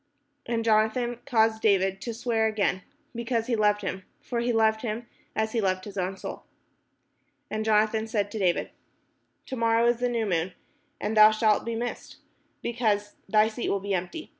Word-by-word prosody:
And 230 -1 -1
Jonathan 225 +2 +2
caused 220 -3 +2
David 195 -2 +2
to 235 - -4
swear 225 -1 +1
again, 205 -3 0 0.3
because 235 -1 -1
he 245 -1 0
loved 210 -1 +2
him: 190 -1 -4 0.2
for 240 - -3
he 240 +1 0
loved 220 -1 +2
him 230 0 -4 0.3
as 220 0 0
he 230 - 0
loved 185 -1 0
his 205 - -9
own 190 0 -2
soul. - - -7 1.1
Then 215 0 -1
Jonathan 220 0 +2
said 205 -2 -1
to 220 - -4
David: 180 -3 +1 0.7
"To 260 - -5
morrow 230 -1 +2
is 240 0 +3
the 245 +1 0
new 230 -2 0
moon: 180 -2 -1 0.5
and 215 +2 -2
thou 215 0 +9
shalt 215 -1 +2
be 230 0 -2
missed, 240 +1 -5 0.5
because 215 -4 0 0.2
thy 215 +1 +5
seat 225 +2 -3
will 200 - +1
be 200 +1 -3
empty. 185 - -4
220 Hz, 180 wpm, -27 LUFS, 205-230 Hz, 1.1 s, thou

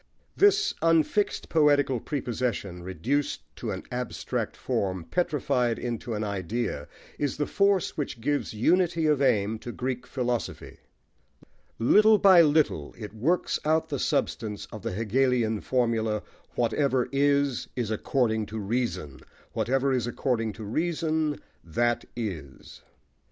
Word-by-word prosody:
This 410 0 +4
unfixed 165 +5 +2
poetical 145 -5 +3
prepossession, 120 - -3
reduced 110 - -2
to - - -4
an - - -4
abstract 125 0 -3
form, 95 -3 -2
petrified 125 - 0
into 120 -1 -4
an 105 - -2
idea, 100 -4 -3 0.3
is 145 -3 -1
the 145 - 0
force 200 +1 +2
which 135 -6 -3
gives 145 +5 -1
unity 165 - +2
of 150 -2 +3
aim 110 -4 +2
to 120 - -7
Greek 125 0 -4
philosophy. 125 -3 -3 1.0
Little 215 - +6
by 190 -4 +7
little, 150 - +2
it 105 -2 -8
works 150 +12 0
out 160 +1 +1
the 140 -4 -2
substance 105 -4 -1
of 110 - -8
the - - -3
Hegelian 115 0 +1
formula: 115 -4 0 0.3
"Whatever 125 +2 +1
is, 140 -2 +2
is 120 -4 -2
according 110 -1 0
to 110 - -6
reason: 100 - -2 0.3
whatever 135 +2 +1
is 120 -2 0
according 120 -3 -1
to 110 - -9
reason, 155 +4 -1 0.2
that 120 +9 0
is." 85 - -6
125 Hz, 125 wpm, -27 LUFS, 110-145 Hz, 1.0 s, by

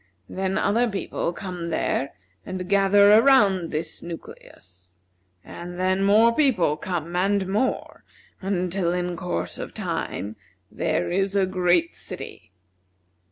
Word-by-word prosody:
Then 190 +1 -2
other 225 +4 +2
people 195 -4 -3
come 180 -2 -6
there, 140 -4 -1 0.3
and 185 -1 -5
gather 200 +1 +5
around 210 -7 +5
this 160 +1 -4
nucleus, 90 - -11 0.5
and 175 +1 -9
then 185 +1 +1
more 220 +4 +5
people 230 - +2
come 170 +1 -4
and 195 +1 +1
more, 215 +7 -2 0.4
until 185 -2 -1
in 180 0 -2
course 175 +1 -3
of - - -7
time 105 +2 -4 0.3
there - - -1
is 195 +2 0
a 195 -1 +3
great 180 -2 +1
city. - - -9
185 Hz, 120 wpm, -24 LUFS, 175-200 Hz, 0.5 s, gather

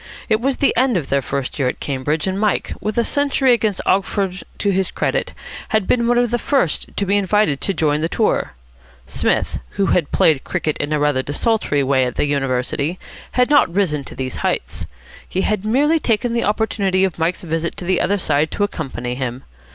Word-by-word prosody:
It 220 0 +2
was 270 +1 0
the 280 - +2
end 250 -3 +3
of 150 -6 -4
their 140 0 +2
first 140 +2 -4
year 135 - +2
at 125 - -3
Cambridge, 145 +3 -1
and 190 0 -1
Mike, 210 -1 0
with 215 +1 -3
a 235 - +4
century 275 -1 +2
against 215 -5 0
Oxford 190 -1 0
to 200 - +1
his 190 0 +1
credit, - - -1 0.4
had 220 -3 +1
been 235 +2 +2
one 240 0 +3
of 240 -1 +2
the 240 - +1
first 265 - 0
to 200 - +1
be 200 +2 +2
invited 200 -7 +1
to - - +1
join 150 -2 +1
the 165 - 0
tour. 210 - 0 0.5
Psmith, - - 0 0.2
who 200 - +3
had 165 -5 +1
played 150 -4 +3
cricket 160 -4 -2
in 145 +1 -2
a 155 - +2
rather 145 -3 +1
desultory 145 - 0
way 135 -1 +2
at 125 - -4
the - - +1
University, 140 +3 -1 0.4
had 250 +2 +2
not 290 - +5
risen 170 -6 0
to - - -9
these 130 -1 -4
heights. - - -2 0.4
He 190 - -1
had 210 -1 0
merely 290 +9 +2
taken 235 -2 0
the 235 - +1
opportunity 200 -3 +1
of 185 -3 -1
Mike's 165 +3 0
visit 165 0 -2
to 180 - -6
the 185 0 +2
other 200 +3 +1
side 155 -3 +1
to 205 - -1
accompany 130 -10 -3
him. 125 0 -4
185 Hz, 205 wpm, -19 LUFS, 145-215 Hz, 0.5 s, not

